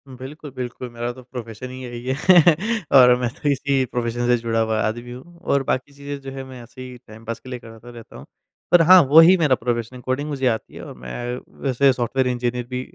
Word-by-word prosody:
बिल्कुल, 140 +4 -10
बिल्कुल 125 0 -6
मेरा 120 +1 -4
तो 130 0 -14
प्रोफ़ेशन 120 -1 -8
ही 130 0 -9
यही 120 -1 -8
है। 130 - 0 0.8
और 125 -1 +7
मैं 125 -1 -1
तो 145 - -2
इसी 140 -1 +1
प्रोफ़ेशन 120 0 -3
से 120 0 +4
जुड़ा 115 -1 -2
हुआ 110 -1 0
आदमी 120 +3 -3
हूँ 170 +8 -12
और 140 -6 0
बाकी 130 +2 -2
चीज़ें 140 0 -7
जो 135 0 -8
है 135 0 -7
मैं 130 -2 -11
ऐसे 125 +2 -13
ही 125 -1 -9
टाइम 110 +1 -14
पास 115 0 -5
के 130 - -13
लिए 125 - -6
करता 115 +1 -14
रहता 120 -2 -13
हूँ। - - -12 0.5
पर 175 - +7
हाँ 180 +2 +8
वहीं 165 +5 +8
मेरा 150 -6 +3
प्रोफ़ेशन 120 +1 -4
कोडिंग 130 +4 -3
मुझे 135 -3 -1
आती 110 -2 -2
है - - -9
और - - -9
मैं 120 - -5 0.2
वैसे 135 0 +3
सॉफ्टवेयर 125 +2 -1
इंजीनियर 125 0 -2
भी 125 0 -3
125 Hz, 220 wpm, -21 LUFS, 120-135 Hz, 0.8 s, हाँ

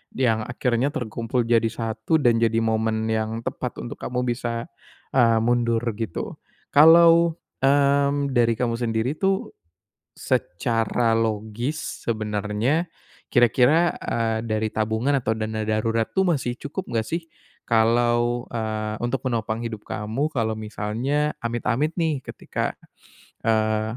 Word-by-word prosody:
yang 115 -4 +2
akhirnya 120 +2 0
terkumpul 120 0 -2
jadi 115 -1 +3
satu 115 +5 -2
dan 120 -5 +3
jadi 115 0 +2
momen 110 0 0
yang 110 0 -1
tepat - - -4
untuk - - -6
kamu 125 0 -2
bisa, 120 -1 -2 0.5
eee, 115 -3 +5
mundur 120 -1 +1
gitu. 110 -5 -4 0.4
Kalau, 165 +2 +7 0.3
mmm, 140 0 +3
dari 120 -1 +4
kamu 120 -2 0
sendiri 115 +3 -1
tuh, 195 0 0 0.6
secara 115 +3 0
logis 110 +6 -3
sebenarnya 110 - 0 0.5
kira-kira, 125 +7 +4
eee, 115 -1 -1
dari 110 0 0
tabungan 110 +6 0
atau 115 -4 -1
dana 110 0 -3
darurat 115 +1 +1
tuh 190 - +3
masih 125 -3 -3
cukup 150 +6 -5 0.2
gak 110 - -6
sih 165 +1 -2 0.4
kalau, 120 +1 +2
eee, 110 -2 -3
untuk 120 +3 -2
menopang 115 -2 -2
hidup 110 -2 -6
kamu 110 +8 -2
kalau 115 -7 -1
misalnya 110 +7 -2
amit-amit 120 +6 -1
nih 160 -5 0
ketika, - - -4 0.6
eee, 110 0 0
115 Hz, 125 wpm, -24 LUFS, 110-130 Hz, 0.6 s, Kalau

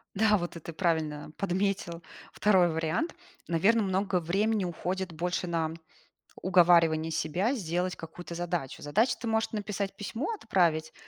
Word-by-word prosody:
Да, 210 0 +4
вот 175 -1 -4
это 165 0 -8
правильно 155 -4 -1
подметил 190 -3 -1 0.3
2-й 190 -4 +4
вариант. 160 - -1 0.3
Наверно, 200 +7 +3
много 190 -1 +1
времени 200 +5 +1
уходит 180 +1 -3
больше 175 +2 -2
на 165 -2 -1 0.7
уговаривание 170 -3 +4
себя 180 - 0
сделать 180 -4 -1
какую-то 165 +1 -8
задачу. 175 -6 -3
Задача- 215 - +2
ты 235 - -5
можешь 220 0 +1
написать 205 -2 -3
письмо, 225 - -3
отправить, 160 - +1
180 Hz, 130 wpm, -29 LUFS, 165-200 Hz, 0.7 s, Да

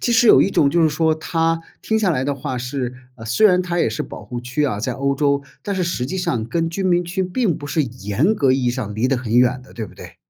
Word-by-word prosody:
其 - - 0
实 235 0 +4
有 - - +8
一 195 - +3
种 140 -7 +3
就 170 +3 +3
是 160 - +5
说， 160 +1 +1
它 165 +1 0 0.2
听 220 0 +1
下 200 -4 +2
来 130 -5 0
的 145 - -1
话 135 -1 -4
是 125 0 -3 0.2
呃， 115 -3 -11
虽 115 - +4
然 180 -3 +4
它 175 -1 -2
也 - - +2
是 110 - -3
保 105 - -9
护 120 +3 -6
区 130 +5 -1
啊， 105 -8 -1
在 125 +2 -1
欧 140 +2 0
洲， 140 0 +1 0.2
但 200 -1 -3
是 185 - 0
实 150 -7 -2
际 185 - -4
上 120 -11 -1
跟 165 +7 -1
居 195 +4 -3
民 175 -2 +2
区 185 +3 -2
并 185 -1 0
不 145 - -8
是 155 +2 +1
严 125 - 0
格 140 -10 +2
意 130 -1 0
义 120 - +2
上 120 -5 -4
离 110 +4 +1
得 130 -2 +1
很 120 -1 -1
远 125 +1 +3
的， 135 - -17
对 115 - -4
不 105 - -13
对？ - - -12
140 Hz, 310 characters per minute, -20 LUFS, 125-175 Hz, 0.2 s, 有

